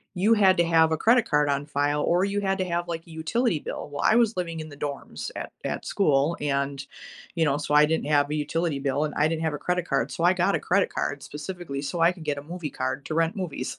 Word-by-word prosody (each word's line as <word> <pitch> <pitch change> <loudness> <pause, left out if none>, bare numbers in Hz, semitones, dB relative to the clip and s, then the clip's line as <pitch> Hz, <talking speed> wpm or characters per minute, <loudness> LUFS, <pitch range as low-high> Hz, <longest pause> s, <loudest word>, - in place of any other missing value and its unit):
you 205 +5 +3
had 190 -4 +4
to 170 - +3
have 160 -1 +4
a 160 - +1
credit 230 +6 +3
card 150 0 +3
on 140 0 0
file, 145 0 0
or 175 +3 +2
you 200 +1 -1
had 195 -1 0
to 185 - -1
have, 175 0 -2
like, 165 -1 -5
a - - -13
utility 160 - 0
bill. - - -6
Well, 145 - -4
I - - +4
was 235 -2 +3
living 170 -2 -3
in 155 - -6
the 145 - -12
dorms 140 - -5
at - - -6
that - - -3
school, 150 -3 +2
and, 140 -1 -1 0.5
you 165 -1 +2
know, 140 0 +1
so 150 0 -1
I 150 0 +7
didn't 160 -2 -1
have 145 -1 +3
a 150 - 0
utility 150 0 -1
bill, 140 +2 0
and 150 - -4
I 150 - +3
didn't 160 0 -2
have 160 -2 0
a - - -4
credit 180 0 -1
card, - - 0
so, 170 - -3
I 175 - +5
got 190 +2 +1
a - - 0
credit 195 +3 +1
card, 145 -1 -2
specifically, 150 -1 -6
so 160 +4 -3
I 170 - +6
could 180 -3 -11
get 145 -1 -1
a - - -10
movie 165 -1 -6
card 130 +2 -3
to 155 - -4
rent 165 +2 +1
movies. 160 -9 -4
160 Hz, 270 wpm, -26 LUFS, 145-180 Hz, 0.5 s, I